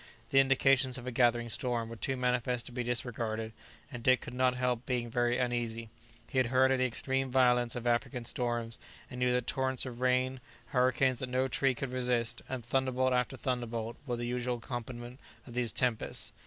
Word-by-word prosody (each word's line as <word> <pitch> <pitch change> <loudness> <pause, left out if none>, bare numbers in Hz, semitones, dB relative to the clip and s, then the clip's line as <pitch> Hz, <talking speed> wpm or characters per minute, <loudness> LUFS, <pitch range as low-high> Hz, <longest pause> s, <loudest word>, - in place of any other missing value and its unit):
The 135 - +6
indications 135 -1 +4
of 125 - -8
a 130 - -3
gathering 120 -1 +3
storm 120 -1 -1
were 115 - -7
too 135 +3 -2
manifest 125 -1 0
to - - -7
be 125 0 -3
disregarded, 115 -2 -2 0.4
and 125 -3 -6
Dick 130 +2 +4
could 125 - -8
not 125 0 +2
help 125 -1 -1
being 120 -2 -1
very 120 +1 +1
uneasy. 120 -3 -2 0.4
He 130 - 0
had 130 - +3
heard 130 +2 +4
of 135 - +2
the 130 - +3
extreme 130 +2 -1
violence 125 -2 +3
of 120 -1 -5
African 120 +1 0
storms, 120 -1 -2 0.3
and 125 - -6
knew 125 0 +2
that 125 -1 +1
torrents 130 -1 0
of 125 -1 -7
rain, 130 +1 +2 0.3
hurricanes 130 0 +2
that 130 - -3
no 130 +1 +1
tree 135 +1 +1
could 130 +1 -4
resist, 125 -2 0
and 125 -3 -4
thunderbolt 130 0 +1
after 125 +1 0
thunderbolt 120 -3 -3
were 120 - 0
the 120 0 -3
usual 125 0 -1
accompaniment 120 +1 -6 0.3
of 120 - -11
these 120 -2 0
tempests. 125 -3 0
125 Hz, 195 wpm, -31 LUFS, 120-130 Hz, 0.4 s, The